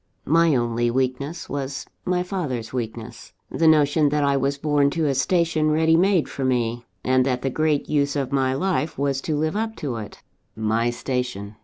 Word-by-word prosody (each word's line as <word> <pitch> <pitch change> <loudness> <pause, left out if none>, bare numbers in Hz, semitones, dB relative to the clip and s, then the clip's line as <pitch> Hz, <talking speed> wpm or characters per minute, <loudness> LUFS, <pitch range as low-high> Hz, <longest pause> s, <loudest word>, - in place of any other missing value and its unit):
"My 165 0 +4
only 120 -1 0
weakness 130 +5 -2
was 140 -1 -4 0.2
my 180 0 +1
father's 130 - -4
weakness 115 -1 -6 0.2
the 165 - +2
notion 150 -1 +4
that 150 0 +1
I 140 0 +2
was 140 +1 0
born 145 -1 +2
to 160 +2 -1
a 140 - +2
station 160 +2 +1
ready 160 +1 +3
made 185 -1 +3
for 135 - -5
me, 120 -2 -1 0.2
and 130 0 +3
that 125 -1 -1
the 135 - 0
great 155 0 0
use 145 -1 +1
of 135 -2 -2
my 130 -1 +1
life 165 0 -1
was 140 -1 0
to 155 0 -2
live 155 +3 -1
up 220 +1 -2
to 130 -6 -4
it. 105 -2 -9 0.3
My 110 +2 0
station! 120 -5 -3
140 Hz, 185 wpm, -23 LUFS, 125-155 Hz, 0.3 s, My